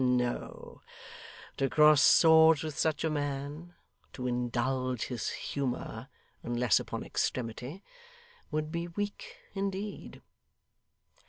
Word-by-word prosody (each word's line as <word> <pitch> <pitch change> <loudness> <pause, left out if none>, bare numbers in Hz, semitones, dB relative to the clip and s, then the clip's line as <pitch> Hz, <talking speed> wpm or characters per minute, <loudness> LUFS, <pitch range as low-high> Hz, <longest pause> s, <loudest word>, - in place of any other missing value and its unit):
No. 125 -1 -2 0.8
To 135 - +1
cross 150 0 +6
swords 160 -1 +6
with 155 -2 -5
such 155 -2 0
a 160 - +1
man 145 +3 -4 0.4
to 125 - -6
indulge 125 0 -1
his 120 -4 -3
humour 135 -3 -4 0.3
unless 120 -2 +2
upon - - -5
extremity 125 - -3 0.7
would 155 0 -2
be 170 +1 -3
weak 205 +4 -5 0.2
indeed. 195 +1 -5
145 Hz, 100 wpm, -30 LUFS, 125-160 Hz, 0.8 s, cross